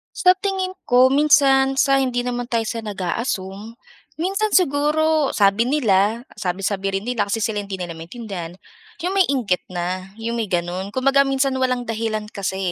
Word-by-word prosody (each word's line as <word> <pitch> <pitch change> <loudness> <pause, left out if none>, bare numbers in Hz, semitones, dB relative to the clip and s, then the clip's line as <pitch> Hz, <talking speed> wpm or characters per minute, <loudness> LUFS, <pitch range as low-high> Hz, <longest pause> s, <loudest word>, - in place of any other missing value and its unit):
Sa 365 -1 +5
tingin 380 -2 -2 0.2
ko, 255 +1 +5
minsan 275 -2 +4
sa 275 0 +3
hindi 245 -2 0
naman 245 -1 -3
tayo 230 -2 0
sa 230 +1 -4
nag-a-assume. 200 +1 -4 0.4
Minsan 390 +6 0
siguro 310 -3 +2
sabi 205 +3 +2
nila, 225 -4 +2
sabi-sabi 195 0 -2
rin 200 - -7
nila 235 -5 -1
kasi 225 - 0
sila 210 -1 -1
hindi 200 -1 -6
nila 175 -2 -5
maintindihan, 175 0 -7 0.5
'yong 360 +2 -3
may 390 -1 +3
inggit 230 -10 0
na. 185 +1 -4
'Yong 230 +1 -3
may 225 -4 -2
gano'n, 175 +2 -2
kumbaga 270 +5 +3
minsan 270 0 +1
walang 255 -2 0
dahilan 220 -1 -2
kasi 190 -1 -3
235 Hz, 160 wpm, -21 LUFS, 195-275 Hz, 0.5 s, Sa